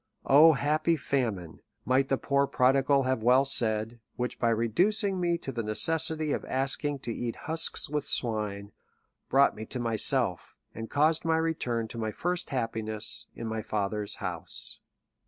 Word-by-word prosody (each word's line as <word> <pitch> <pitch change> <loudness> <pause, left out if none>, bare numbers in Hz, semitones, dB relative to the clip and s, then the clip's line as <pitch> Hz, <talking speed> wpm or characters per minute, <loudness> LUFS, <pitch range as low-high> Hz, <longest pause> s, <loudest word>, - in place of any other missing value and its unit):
O 155 +4 +7
^lappy 155 +4 +1
famine! 110 - -3 0.2
might 130 +2 +2
the 135 - +1
poor 140 +1 +1
prodigal 135 +2 +3
have 130 -3 -1
well 125 +4 +4
said, 115 -3 +1 0.2
which 125 0 -4
by 115 - +2
reducing 180 - +1
me 175 -1 +1
to 140 - -6
the 120 -2 -3
necessity 155 +8 +1
of - - -2
asking 135 +2 -2
to 120 -3 -5
eat 120 0 -4
husks 160 0 0
with 150 0 -2
swine, 105 -4 -1 0.6
brought 140 +1 +4
me 110 - -7
to 125 - 0
myself, 115 -3 +1 0.2
and 115 0 -7
caused 155 +2 +2
my 165 -1 +1
return 125 -8 -1
to 115 - -7
my 110 -1 -2
first 180 +8 -3
happiness, 110 -4 -3
in 115 - -6
my 110 0 -3
father's 105 0 -3
house. - - -4
130 Hz, 155 wpm, -28 LUFS, 110-150 Hz, 0.6 s, O